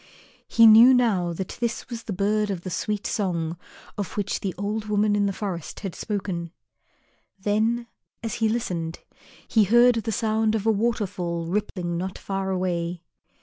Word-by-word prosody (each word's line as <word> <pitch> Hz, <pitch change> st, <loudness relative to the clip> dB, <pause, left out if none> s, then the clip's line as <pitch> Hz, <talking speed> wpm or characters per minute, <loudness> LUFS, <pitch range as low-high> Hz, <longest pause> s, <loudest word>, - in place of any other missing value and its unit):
He 230 Hz, -, +5 dB
knew 230 Hz, +4 st, +9 dB
now 200 Hz, -8 st, +2 dB
that 180 Hz, +2 st, -6 dB
this 235 Hz, -1 st, -2 dB
was 235 Hz, -2 st, -6 dB
the -, -, -4 dB
bird 205 Hz, +2 st, +1 dB
of 190 Hz, -4 st, -3 dB
the 185 Hz, -, -6 dB
sweet 210 Hz, +4 st, -2 dB
song 170 Hz, -6 st, -1 dB, 0.4 s
of 205 Hz, +1 st, -4 dB
which 200 Hz, -1 st, -1 dB
the 190 Hz, -3 st, -3 dB
old 210 Hz, +2 st, -2 dB
woman 210 Hz, 0 st, +2 dB
in 205 Hz, -1 st, +2 dB
the -, -, 0 dB
forest 190 Hz, -5 st, -5 dB
had 195 Hz, -4 st, -4 dB
spoken. 190 Hz, -5 st, -4 dB, 0.9 s
Then, 220 Hz, +4 st, 0 dB, 0.4 s
as 225 Hz, -3 st, -3 dB
he 220 Hz, -, +3 dB
listened, 175 Hz, -8 st, -3 dB, 0.5 s
he 220 Hz, -3 st, +4 dB
heard 240 Hz, +4 st, +6 dB
the 225 Hz, 0 st, -2 dB
sound 220 Hz, 0 st, +1 dB
of 215 Hz, -1 st, -2 dB
a 225 Hz, -, +5 dB
waterfall 200 Hz, -6 st, -1 dB
rippling 175 Hz, -2 st, -2 dB
not 185 Hz, +1 st, -4 dB
far 195 Hz, -1 st, -3 dB
away. 175 Hz, -2 st, -2 dB
205 Hz, 165 wpm, -25 LUFS, 180-220 Hz, 0.9 s, knew